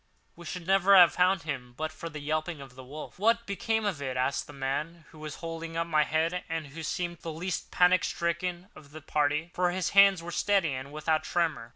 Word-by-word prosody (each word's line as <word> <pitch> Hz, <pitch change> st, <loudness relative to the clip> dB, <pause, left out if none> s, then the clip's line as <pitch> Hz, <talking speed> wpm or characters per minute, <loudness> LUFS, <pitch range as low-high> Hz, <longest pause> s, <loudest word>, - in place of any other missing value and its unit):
We 170 Hz, -1 st, -11 dB
should 180 Hz, 0 st, -6 dB
never 195 Hz, +1 st, +5 dB
have 175 Hz, -3 st, +8 dB
found 185 Hz, 0 st, +2 dB
him 125 Hz, -5 st, -5 dB
but 155 Hz, 0 st, -3 dB
for 160 Hz, +1 st, -7 dB
the 155 Hz, -, -8 dB
yelping 155 Hz, +2 st, -2 dB
of 135 Hz, -2 st, -11 dB
the 130 Hz, +1 st, -11 dB
wolf." 150 Hz, +7 st, -9 dB
"What 230 Hz, +3 st, +2 dB
became 220 Hz, +2 st, -1 dB
of 185 Hz, -8 st, -2 dB
it?" 130 Hz, -2 st, -3 dB
asked 130 Hz, +2 st, 0 dB
the -, -, -10 dB
man 150 Hz, +4 st, -4 dB
who 155 Hz, -, -15 dB
was 155 Hz, -1 st, -6 dB
holding 165 Hz, 0 st, -5 dB
up 165 Hz, -, 0 dB
my 155 Hz, -3 st, +2 dB
head, 165 Hz, +4 st, 0 dB
and 165 Hz, -1 st, -3 dB
who 145 Hz, +3 st, -9 dB
seemed 175 Hz, +2 st, -3 dB
the 165 Hz, -, -6 dB
least 170 Hz, +3 st, -4 dB
panic 180 Hz, 0 st, +4 dB
stricken 175 Hz, +2 st, -2 dB
of 145 Hz, -1 st, -15 dB
the 155 Hz, -, -9 dB
party, 150 Hz, +2 st, 0 dB
for 180 Hz, 0 st, +1 dB
his 180 Hz, 0 st, -1 dB
hands 195 Hz, -3 st, +6 dB
were 175 Hz, -, -6 dB
steady 190 Hz, -4 st, +1 dB
and 130 Hz, +2 st, -6 dB
without 155 Hz, +1 st, 0 dB
tremor. 160 Hz, -9 st, -1 dB
165 Hz, 225 wpm, -29 LUFS, 150-180 Hz, -, have